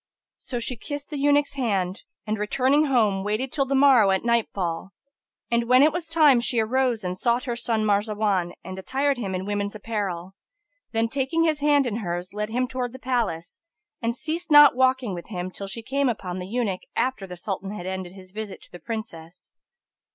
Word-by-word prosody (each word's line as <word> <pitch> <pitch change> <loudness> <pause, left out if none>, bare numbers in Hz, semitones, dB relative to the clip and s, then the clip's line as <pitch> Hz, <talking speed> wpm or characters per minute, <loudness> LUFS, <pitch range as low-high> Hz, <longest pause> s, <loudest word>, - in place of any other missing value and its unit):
So 245 - -5
she 240 +1 -3
kissed 290 +5 -6
the 295 - -3
eunuch's 290 0 +3
hand 200 -8 -1 0.2
and, 215 0 -2
returning 265 +8 +2
home, 215 -8 +2
waited 215 +6 -2
till 275 -3 0
the 275 - 0
morrow 265 -7 +6
at 190 -1 +1
nightfall; 200 -6 -1 0.6
and 235 0 +2
when 255 +2 +7
it 305 0 +4
was 345 -1 -3
time 310 -6 +5
she 235 0 0
arose 240 0 +1
and 180 0 -2
sought 235 +6 +1
her 245 -4 -3
son 230 -2 -1
Marzawan 205 -3 +1
and 185 0 -7
attired 270 +6 0
him 195 -5 -3
in 185 +1 -3
woman's 205 0 -2
apparel; 200 -5 -4 0.6
then, 225 0 +1
taking 270 +6 0
his 315 -2 +1
hand 290 -1 +3
in 225 -3 -2
hers, 175 -3 -4
led 210 +1 -3
him 250 +3 0
towards 250 -1 -3
the - - -8
palace, 235 -11 -2 0.4
and 235 0 -1
ceased 315 +6 -4
not 295 -3 +8
walking 260 -4 +2
with 175 -1 -7
him 185 -3 -5
till 195 +1 -7
she 225 +4 -6
came 275 +2 +1
upon 185 -5 -4
the 180 - -6
eunuch 210 -4 -1
after 255 -7 -1
the 180 -1 -8
Sultan 195 +1 -4
had 200 -3 -6
ended 185 -1 -5
his 185 -1 -14
visit 210 -1 -6
to - - -21
the 175 - -10
Princess. 175 -8 -8
225 Hz, 195 wpm, -25 LUFS, 195-260 Hz, 0.6 s, not